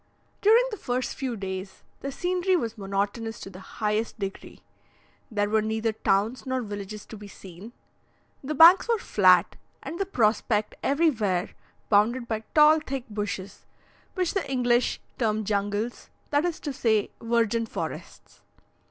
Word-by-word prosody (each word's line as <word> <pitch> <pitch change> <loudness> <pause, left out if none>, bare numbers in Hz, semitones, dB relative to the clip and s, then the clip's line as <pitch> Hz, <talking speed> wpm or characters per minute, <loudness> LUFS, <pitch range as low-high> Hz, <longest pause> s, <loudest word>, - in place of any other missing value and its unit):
During 445 +4 +6
the 425 - -5
first 250 -5 -2
few 255 -4 -3
days, 190 0 -6 0.2
the 275 - -5
scenery 365 +4 0
was 230 -10 -2
monotonous 205 +2 -3
to 195 - -8
the 185 - -11
highest 210 +4 -2
degree; 195 -2 -7 0.7
there 205 -2 0
were 215 +1 +2
neither 220 +1 -1
towns 215 +3 0
nor 260 -2 -2
villages 205 0 -7
to - - -10
be 205 -1 -10
seen; 195 +2 -12 0.7
the 300 +3 -3
banks 340 - +8
were 465 - +3
flat, - - +3 0.3
and 335 - -6
the 390 - -1
prospect 215 - +1
everywhere 235 - +1 0.4
bounded 235 +4 +3
by 220 -2 -1 0.2
tall, 305 +1 +7
thick 275 -4 -5
bushes, 205 -2 -5 0.5
which 365 -3 0
the 375 -8 -2
English 245 -1 +2 0.2
term 220 -2 +1
jungles, 205 +3 -2 0.2
that 290 +3 +2
is 345 -2 -2
to 290 - -4
say, 220 -4 +1
"virgin 230 -1 +1
forests." - - -7
225 Hz, 145 wpm, -26 LUFS, 205-275 Hz, 0.7 s, banks